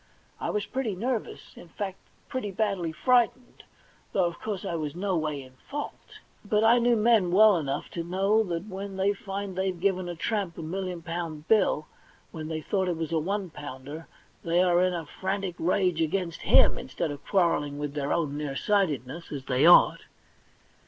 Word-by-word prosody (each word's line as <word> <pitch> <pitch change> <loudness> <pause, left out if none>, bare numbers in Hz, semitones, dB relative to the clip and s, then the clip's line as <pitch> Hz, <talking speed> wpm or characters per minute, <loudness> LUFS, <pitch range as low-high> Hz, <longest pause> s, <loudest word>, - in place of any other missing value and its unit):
I - - -2
was 210 -1 -1
pretty 250 -7 -2
nervous, 235 +3 -3
in 175 - -12
fact 190 +2 -5 0.3
pretty 255 -5 -3
badly 195 -4 -1
frightened, 250 +6 +1 0.5
though, 190 - +3
of 170 0 -3
course, 205 -2 -4
I 190 - -2
was 155 -2 -3
no 190 +1 -1
way 155 -4 -2
in 130 0 -16 0.2
fault; 290 +1 -6 0.3
but 210 +1 +1
I 230 +2 +6
knew 240 0 +3
men 220 -4 +4
well 210 +2 +7
enough 140 -5 -2
to 170 - -3
know 195 +5 +2
that 170 0 -3
when 195 -1 -6
they 195 +2 +2
find 195 -1 -5
they've 190 -1 -1
given 185 -1 0
a 175 - -4
tramp 200 -2 -2
a 165 - -5
million 180 +1 -4
pound 165 -2 -5
bill 205 -8 +3 0.5
when 155 -1 -6
they 160 0 -3
thought 190 +4 0
it 170 - -1
was 165 -1 -3
a 165 - +2
one 190 +2 -2
pounder, 145 +2 -8 0.4
they 170 +2 +3
are 175 -1 +4
in 185 -1 +2
a 165 -2 -4
frantic 190 +3 -3
rage 180 -1 +1
against 170 +1 -1
Mm - - +5
instead 155 - -3
of 145 - -8
quarrelling 165 -7 +1
with 145 -1 -4
their 145 -1 -2
own 150 -4 0
near 145 -2 -3
sighted 170 - +1
ness, 165 +7 -9
as 140 -3 -5
they 130 +5 +3
ought. 175 - +7
180 Hz, 190 wpm, -27 LUFS, 160-200 Hz, 0.5 s, well